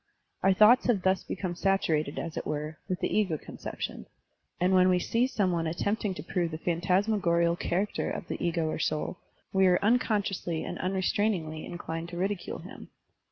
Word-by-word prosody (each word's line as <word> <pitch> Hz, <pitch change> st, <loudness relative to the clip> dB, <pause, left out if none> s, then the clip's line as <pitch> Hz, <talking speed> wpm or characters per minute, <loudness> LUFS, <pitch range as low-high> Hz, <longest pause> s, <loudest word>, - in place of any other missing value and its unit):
Our 195 Hz, -, +4 dB
thoughts 215 Hz, +6 st, +6 dB
have 210 Hz, -7 st, +2 dB
thus 190 Hz, 0 st, +2 dB
become 185 Hz, -2 st, -3 dB
saturated, 170 Hz, -6 st, +1 dB
as 165 Hz, -2 st, -4 dB
it -, -, -4 dB
were, 150 Hz, +1 st, -4 dB
with 185 Hz, -, -2 dB
the -, -, 0 dB
ego 190 Hz, -7 st, +2 dB
conception; -, -, -6 dB, 0.5 s
and 180 Hz, +2 st, +3 dB
when 185 Hz, 0 st, +6 dB
we 180 Hz, -, +4 dB
see 230 Hz, +7 st, +1 dB
some 200 Hz, -8 st, +1 dB
one 165 Hz, -2 st, 0 dB
attempting 200 Hz, +4 st, -1 dB
io 150 Hz, -, -6 dB
prove 175 Hz, -2 st, 0 dB
the 155 Hz, -, -5 dB
phantasmagorial 175 Hz, 0 st, +2 dB
char 180 Hz, +3 st, 0 dB
acter -, -, -3 dB
of -, -, -5 dB
the -, -, -4 dB
ego 170 Hz, -2 st, 0 dB
or 155 Hz, -, -2 dB
soul, 155 Hz, +3 st, -1 dB, 0.3 s
we 190 Hz, -1 st, +5 dB
are 180 Hz, -1 st, +5 dB
unconsciously 205 Hz, -7 st, +1 dB
and -, -, -5 dB
tmrestrainingly 185 Hz, -3 st, -1 dB
inclined 165 Hz, -1 st, -5 dB
to 175 Hz, -, -7 dB
ridicule 195 Hz, +1 st, -2 dB
him. -, -, -11 dB
180 Hz, 180 wpm, -29 LUFS, 170-195 Hz, 0.5 s, thoughts